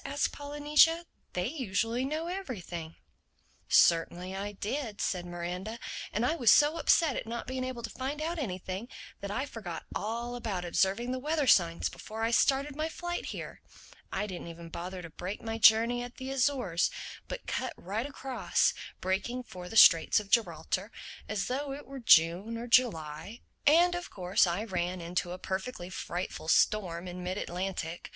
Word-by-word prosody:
asked 285 Hz, +1 st, -1 dB
Polynesia. 295 Hz, +3 st, +3 dB, 0.3 s
"They 180 Hz, 0 st, -1 dB
usually 235 Hz, -2 st, -1 dB
know 310 Hz, +4 st, -2 dB
everything." 195 Hz, -, -5 dB, 0.7 s
"Certainly 175 Hz, +2 st, +3 dB
I 205 Hz, +1 st, -4 dB
did," 215 Hz, +2 st, -4 dB
said 175 Hz, -2 st, -1 dB
Miranda. 180 Hz, +5 st, -5 dB, 0.3 s
"And 220 Hz, +3 st, 0 dB
I 315 Hz, -, +2 dB
was 240 Hz, -9 st, +3 dB
so 295 Hz, +7 st, +6 dB
upset 315 Hz, -6 st, +4 dB
at -, -, -4 dB
not 235 Hz, +1 st, -4 dB
being 260 Hz, 0 st, -3 dB
able 255 Hz, -2 st, -5 dB
to -, -, -4 dB
find 270 Hz, +3 st, -4 dB
out 330 Hz, +2 st, -2 dB
anything, 190 Hz, -2 st, -4 dB, 0.3 s
that 200 Hz, -, -5 dB
I 260 Hz, +7 st, -1 dB
forgot 200 Hz, -, -7 dB
all 235 Hz, +3 st, -3 dB
about 205 Hz, -7 st, -3 dB
observing 195 Hz, +7 st, +1 dB
the 255 Hz, -, -2 dB
weather 300 Hz, +2 st, 0 dB
signs 170 Hz, -8 st, +4 dB
before 220 Hz, +1 st, -6 dB
I 225 Hz, -, +1 dB
started 275 Hz, +4 st, +2 dB
my 310 Hz, +2 st, -1 dB
flight 350 Hz, +1 st, -4 dB
here. -, -, -7 dB, 0.5 s
I 210 Hz, -, -1 dB
didn't 185 Hz, -4 st, -6 dB
even 170 Hz, 0 st, -9 dB
bother 180 Hz, +2 st, -6 dB
to 165 Hz, -, -8 dB
break 185 Hz, +5 st, -5 dB
my 225 Hz, 0 st, -3 dB
journey 230 Hz, +2 st, +6 dB
at 245 Hz, 0 st, -7 dB
the 260 Hz, 0 st, -5 dB
Azores, 255 Hz, -10 st, +1 dB, 0.4 s
but -, -, -6 dB
cut -, -, -2 dB
right 215 Hz, +8 st, -3 dB
across, 270 Hz, -2 st, 0 dB, 0.3 s
making 225 Hz, +7 st, -1 dB
for 180 Hz, -6 st, -9 dB
the 225 Hz, -, -2 dB
Straits 165 Hz, -2 st, +8 dB
of 200 Hz, -2 st, -10 dB
Gibraltar—as 195 Hz, +1 st, -1 dB
though 275 Hz, +2 st, -2 dB
it 285 Hz, -, -8 dB
were 275 Hz, 0 st, -8 dB
June 190 Hz, +1 st, +5 dB
or 235 Hz, -, -5 dB
July. 210 Hz, -5 st, +1 dB, 0.3 s
And 345 Hz, +4 st, +6 dB
of 350 Hz, 0 st, -4 dB
course 185 Hz, 0 st, +2 dB
I 175 Hz, +5 st, -1 dB
ran 180 Hz, -3 st, -2 dB
into 175 Hz, +1 st, -2 dB
a 180 Hz, -, -5 dB
perfectly 190 Hz, 0 st, -4 dB
frightful 175 Hz, -2 st, -5 dB
storm 180 Hz, -1 st, +2 dB
in 180 Hz, 0 st, -6 dB
mid 180 Hz, +2 st, -3 dB
Atlantic. 175 Hz, -3 st, -4 dB
220 Hz, 170 wpm, -30 LUFS, 180-260 Hz, 0.7 s, Straits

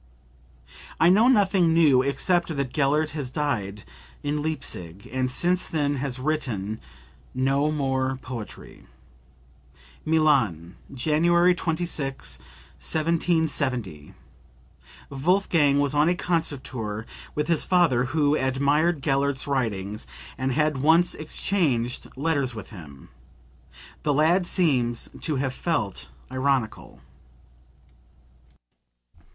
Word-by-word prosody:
"I 165 Hz, -, +5 dB
know 210 Hz, +6 st, +5 dB
nothing 195 Hz, -8 st, +3 dB
new 145 Hz, -6 st, +5 dB
except 165 Hz, +4 st, 0 dB
that 140 Hz, -3 st, -2 dB
Gellert 150 Hz, +2 st, +1 dB
has 145 Hz, -5 st, -4 dB
died 110 Hz, -9 st, -3 dB, 0.4 s
in 145 Hz, +1 st, -1 dB
Leipsic 100 Hz, -, -4 dB
and 130 Hz, -1 st, 0 dB
since 175 Hz, +7 st, +2 dB
then 145 Hz, -3 st, -1 dB
has 135 Hz, -1 st, -3 dB
written 125 Hz, -8 st, -3 dB, 0.5 s
no 135 Hz, +3 st, +1 dB
more 135 Hz, -3 st, -1 dB
poetry." 125 Hz, -4 st, -9 dB, 1.2 s
(Milan, 130 Hz, -, +1 dB, 0.2 s
January 170 Hz, +6 st, +3 dB
26, 160 Hz, -, -1 dB, 0.4 s
1770. 150 Hz, -, -1 dB, 1.0 s
Wolfgang 150 Hz, -1 st, +2 dB
was 145 Hz, -1 st, +1 dB
on 150 Hz, +2 st, +3 dB
a 180 Hz, -, +1 dB
concert 165 Hz, -6 st, -1 dB
tour 110 Hz, -3 st, -5 dB, 0.3 s
with 150 Hz, -, -1 dB
his 170 Hz, -2 st, +2 dB
father 165 Hz, -9 st, +3 dB
who 145 Hz, +2 st, +1 dB
admired 140 Hz, +4 st, +1 dB
Gellert's 140 Hz, -1 st, 0 dB
writings 105 Hz, -, -2 dB, 0.3 s
and 130 Hz, +1 st, -2 dB
had 150 Hz, +1 st, +1 dB
once 160 Hz, +6 st, +4 dB
exchanged 150 Hz, -7 st, -1 dB
letters 140 Hz, -4 st, -1 dB
with 110 Hz, -, -8 dB
him. 75 Hz, -, -12 dB, 0.9 s
The 145 Hz, -2 st, 0 dB
lad 170 Hz, +5 st, +3 dB
seems 125 Hz, -11 st, +1 dB
to 155 Hz, -, -1 dB
have 130 Hz, -1 st, -1 dB
felt 130 Hz, -, -2 dB, 0.2 s
ironical.) 130 Hz, -, -2 dB
140 Hz, 100 wpm, -25 LUFS, 125-160 Hz, 1.2 s, I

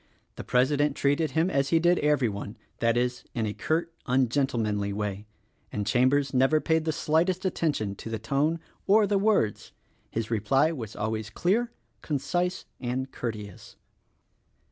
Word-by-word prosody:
The -, -, -7 dB
President 145 Hz, +3 st, +2 dB
treated 145 Hz, +2 st, +1 dB
him 170 Hz, +4 st, +3 dB
as 140 Hz, 0 st, +1 dB
he 165 Hz, -, +4 dB
did 175 Hz, +2 st, +3 dB
every 145 Hz, -4 st, +2 dB
one; 100 Hz, +1 st, -6 dB, 0.2 s
that 115 Hz, 0 st, +2 dB
is, 125 Hz, 0 st, -1 dB
in 115 Hz, -3 st, 0 dB
a 105 Hz, -, -2 dB
curt, 165 Hz, +6 st, -1 dB
ungentlemanly 120 Hz, -5 st, +1 dB
way 105 Hz, 0 st, -4 dB, 0.2 s
— -, -, -41 dB
and 105 Hz, -1 st, -2 dB
Chambers 130 Hz, +5 st, +2 dB
never 135 Hz, +4 st, +4 dB
paid 160 Hz, 0 st, +1 dB
the 160 Hz, -, +1 dB
slightest 175 Hz, +5 st, +1 dB
attention 145 Hz, -, 0 dB
to -, -, -7 dB
the 110 Hz, -, -2 dB
tone 140 Hz, +9 st, 0 dB, 0.3 s
or 210 Hz, +2 st, +6 dB
the 200 Hz, 0 st, +1 dB
words. 195 Hz, -, +1 dB, 0.4 s
His 115 Hz, 0 st, -3 dB
reply 135 Hz, +8 st, +2 dB
was 115 Hz, -9 st, -6 dB
always 110 Hz, 0 st, -3 dB
clear, 215 Hz, -, 0 dB, 0.3 s
concise 175 Hz, +5 st, -1 dB
and 130 Hz, +1 st, -3 dB
courteous. 105 Hz, -5 st, -6 dB
135 Hz, 155 wpm, -27 LUFS, 110-160 Hz, 0.4 s, or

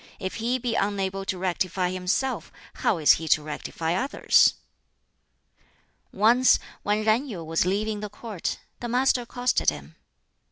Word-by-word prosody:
If 190 Hz, -1 st, -5 dB
he 235 Hz, +3 st, 0 dB
be 245 Hz, -2 st, -2 dB
unable 195 Hz, -2 st, -1 dB
to 190 Hz, -, -2 dB
rectify 180 Hz, 0 st, -1 dB
himself, 185 Hz, +9 st, -2 dB, 0.3 s
how 195 Hz, -, +2 dB
is 155 Hz, -2 st, +5 dB
he 160 Hz, -, -6 dB
to 155 Hz, 0 st, +3 dB
rectify 160 Hz, +2 st, -4 dB
others?" 265 Hz, +10 st, +3 dB, 1.6 s
Once 235 Hz, +5 st, +4 dB, 0.2 s
when 210 Hz, +1 st, 0 dB
Yen 220 Hz, +6 st, +2 dB
Yu 190 Hz, -10 st, -6 dB
was 165 Hz, +2 st, 0 dB
leaving 210 Hz, +2 st, -1 dB
the 210 Hz, 0 st, -5 dB
Court, 210 Hz, -3 st, -5 dB, 0.2 s
the 240 Hz, -, -4 dB
Master 250 Hz, +1 st, +2 dB
accosted 245 Hz, +1 st, +1 dB
him. 75 Hz, +1 st, -8 dB
200 Hz, 145 wpm, -25 LUFS, 180-235 Hz, 1.6 s, is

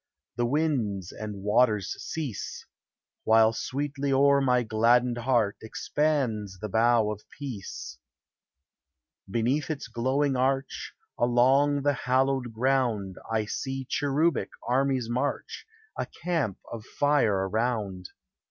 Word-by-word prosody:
The 120 Hz, 0 st, 0 dB
winds 120 Hz, -, 0 dB
and 105 Hz, -2 st, -7 dB
waters 105 Hz, -2 st, +2 dB
cease; 145 Hz, -10 st, -5 dB, 0.6 s
While 110 Hz, 0 st, +5 dB
sweetly 140 Hz, +3 st, -3 dB
o'er 140 Hz, +1 st, +4 dB
my 125 Hz, -2 st, +3 dB
gladdened 120 Hz, +2 st, +2 dB
heart 120 Hz, -4 st, +1 dB
Expands 110 Hz, -5 st, -1 dB
the 105 Hz, +3 st, -6 dB
bow 115 Hz, 0 st, +3 dB
of 105 Hz, -1 st, -6 dB, 0.2 s
peace! 130 Hz, -9 st, -7 dB, 1.3 s
Beneath 125 Hz, +7 st, 0 dB
its 155 Hz, -3 st, -4 dB
glowing 135 Hz, +3 st, 0 dB
arch, 135 Hz, +1 st, -1 dB, 0.3 s
Along 135 Hz, +4 st, +3 dB
the 145 Hz, 0 st, +3 dB
hallowed 130 Hz, -1 st, 0 dB
ground, 115 Hz, -6 st, 0 dB
I 110 Hz, -1 st, +1 dB
see 135 Hz, +4 st, -4 dB
cherubic 145 Hz, +3 st, +1 dB, 0.2 s
armies 130 Hz, -1 st, +1 dB
march, 125 Hz, -, -3 dB, 0.3 s
A -, -, -3 dB
camp 160 Hz, -, -2 dB
of 115 Hz, -2 st, -6 dB
fire 115 Hz, -9 st, +1 dB
around. 105 Hz, -4 st, -2 dB
125 Hz, 110 wpm, -27 LUFS, 110-140 Hz, 1.3 s, While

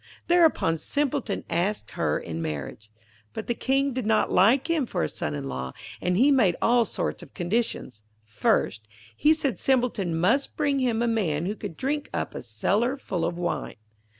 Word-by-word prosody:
Thereupon 325 Hz, -, +3 dB
Simpleton 280 Hz, -, -1 dB
asked 170 Hz, -, -1 dB
her -, -, 0 dB
in 80 Hz, 0 st, -5 dB
marriage. 80 Hz, +7 st, -5 dB, 0.4 s
But -, -, -5 dB
the 240 Hz, -, 0 dB
King 270 Hz, +3 st, 0 dB
did 250 Hz, -4 st, -3 dB
not 220 Hz, -1 st, +2 dB
like 235 Hz, +10 st, +4 dB
him 320 Hz, -6 st, +1 dB
for -, -, -1 dB
a -, -, +1 dB
son 75 Hz, -1 st, -4 dB
in 70 Hz, -1 st, -4 dB
law, 65 Hz, -1 st, -4 dB, 0.3 s
and 180 Hz, 0 st, +1 dB
he 270 Hz, +6 st, +5 dB
made 220 Hz, -11 st, +4 dB
all 240 Hz, 0 st, +4 dB
sorts -, -, -3 dB
of 165 Hz, -6 st, -14 dB
conditions. 175 Hz, -, -2 dB, 0.2 s
First, 105 Hz, 0 st, 0 dB, 0.3 s
he 300 Hz, -, +4 dB
said 295 Hz, -6 st, 0 dB
Simpleton 240 Hz, -10 st, +1 dB
must 230 Hz, +11 st, +1 dB
bring 285 Hz, -2 st, +1 dB
him 235 Hz, -3 st, +1 dB
a -, -, +1 dB
man 175 Hz, -9 st, 0 dB
who 205 Hz, +3 st, -2 dB
could 165 Hz, -, -7 dB
drink 290 Hz, +2 st, -2 dB
up -, -, -2 dB
a -, -, -5 dB
cellar 205 Hz, -, 0 dB
full 180 Hz, -10 st, -3 dB
of 170 Hz, -, -1 dB
wine. 175 Hz, 0 st, -3 dB
215 Hz, 180 wpm, -26 LUFS, 160-265 Hz, 0.4 s, he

